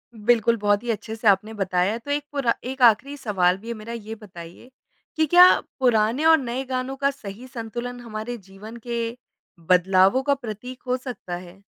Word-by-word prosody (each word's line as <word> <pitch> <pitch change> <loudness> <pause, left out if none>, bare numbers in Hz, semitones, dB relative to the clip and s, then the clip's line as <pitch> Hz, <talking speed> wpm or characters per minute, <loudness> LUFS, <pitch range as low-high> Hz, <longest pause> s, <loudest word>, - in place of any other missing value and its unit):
बिल्कुल, 230 +1 +2
बहुत 205 0 +1
ही 240 - -6
अच्छे 220 0 -5
से 225 0 -2
आपने 205 +2 +3
बताया। 190 0 0
तो 285 +5 -7
एक 290 0 0
पूरा 275 -5 +1
एक 260 +1 -6
आखिरी 245 +4 +4
सवाल 185 -7 +1
भी 215 +4 -14
है 235 - -3
मेरा। 220 +1 -8
ये 220 -1 -7
बताइए 180 +1 -12 0.5
कि 315 - +2
क्या 355 +4 +8 0.3
पुराने 240 +2 +2
और 320 0 +7
नए 255 -1 -3
गानों 255 +1 -3
का 275 +1 +1
सही 230 -2 -10
संतुलन 240 +1 -6
हमारे 230 +1 -6
जीवन 200 +3 -12
के 235 0 -3 0.5
बदलावों 190 +7 +4
का 285 - +2
प्रतीक 250 0 -7
हो 250 - +1
सकता 250 -9 -7
है? 180 +2 -11
230 Hz, 185 wpm, -23 LUFS, 205-255 Hz, 0.5 s, क्या